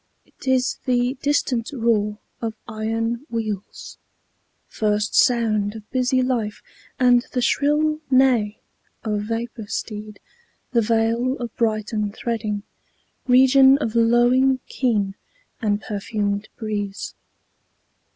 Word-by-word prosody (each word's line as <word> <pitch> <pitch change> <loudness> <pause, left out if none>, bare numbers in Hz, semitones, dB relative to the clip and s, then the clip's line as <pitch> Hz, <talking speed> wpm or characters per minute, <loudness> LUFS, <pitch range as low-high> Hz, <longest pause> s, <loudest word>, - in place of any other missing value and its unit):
't - - -16
is 260 -1 +1
the 245 0 +1
distant 270 -5 0
roar 225 -5 +1 0.2
of 225 -2 -3
iron 225 +3 -2
wheels, 215 -4 -5 0.7
First 210 0 -1
sound 220 -5 +2
of 215 -1 -10
busy 255 0 +2
life, 230 -5 -2 0.4
and 245 -1 +5
the 250 - 0
shrill 305 +3 +2
neigh 255 -6 +3 0.5
Of 210 -2 -1
vapor 225 0 -4
steed, 210 -1 -5 0.5
the 235 - +3
vale 230 +4 +1
of 240 -2 -6
Brighton 215 -2 -1
threading, 215 -2 -3 0.6
Region 265 +1 +6
of 225 -7 -3
lowing 240 +3 +4
kine 210 -7 0 0.5
and 205 -2 +1
perfumed 205 0 -3
breeze. 205 -3 -4
230 Hz, 105 wpm, -22 LUFS, 210-250 Hz, 0.7 s, Region